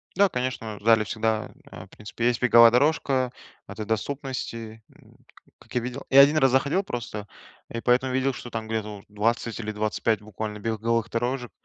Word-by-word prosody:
Да, 200 +1 +4
конечно, 125 - -4
в - - -21
зале 110 -1 +5
всегда, 110 +1 -2 0.2
э, 90 +1 -10
в - - -23
принципе, 105 +4 -6
есть 120 -1 0
беговая 115 -2 +7
дорожка 130 -1 +2 0.4
в - - -10
этой 110 - -6
доступности, 115 -1 -4
м, - - -22
ка - - -24
как - - -15
я 125 - +2
видел. 125 +3 -6
Я 135 +1 +9
1 145 +3 +5
раз 135 -4 +4
заходил 140 +9 +2
просто, 115 - -6 0.4
и 115 - -5
поэтому 125 +2 +2
видел, 130 +1 +1
что 120 - -8
там 115 -1 -5
где-то 105 -2 -4
вот 100 - -16
20 115 +2 -1
или 110 -2 -4
25 110 0 -1
буквально 105 0 -6
беговых 115 +1 -1
дорожек, 120 +1 -2
115 Hz, 190 wpm, -25 LUFS, 110-130 Hz, 0.4 s, Я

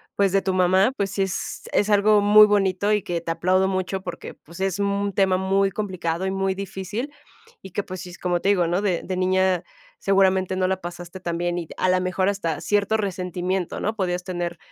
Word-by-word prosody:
pues, 200 -2 +2
de 195 - +3
tu 190 -1 -1
mamá, 185 +6 +3
pues, 195 -1 -1
sí 200 - -2
es 190 0 -3
es 210 +1 +2
algo 205 +1 +5
muy 210 +1 +7
bonito 200 0 +1
y 210 -2 +2
que 170 -1 -3
te 170 - -7
aplaudo 185 +3 +2
mucho, 190 0 -2
porque, 175 -2 -7
pues, 170 +4 -13
es 195 0 -1
un 200 0 0
tema 190 -1 +2
muy 195 +1 +2
complicado 185 -4 -3
y 190 - -1
muy 195 0 -1
difícil, 200 +7 -5 0.5
y 190 - -10
que, 200 +3 -3
pues, 185 -2 -7
sí 180 - -8
es 175 - -11
como 175 -1 0
te 195 - 0
digo, 180 -4 +3
¿no? 175 +4 0
De 185 -4 0
de 185 - -3
niña 185 -1 +2 0.4
seguramente 190 -1 +2
no 185 0 +1
la 190 0 -1
pasaste 175 +1 -8
tan 170 -2 -3
bien 175 0 -1
y, 170 -2 -4
a 185 - +1
la 185 0 +3
mejor, 185 +1 0
hasta 170 -6 -2
cierto 205 +1 +1
resentimiento, 185 -2 -2
¿no?, 215 - -2
podías 180 -3 -2
tener 175 -1 -4
190 Hz, 220 wpm, -23 LUFS, 180-200 Hz, 0.5 s, muy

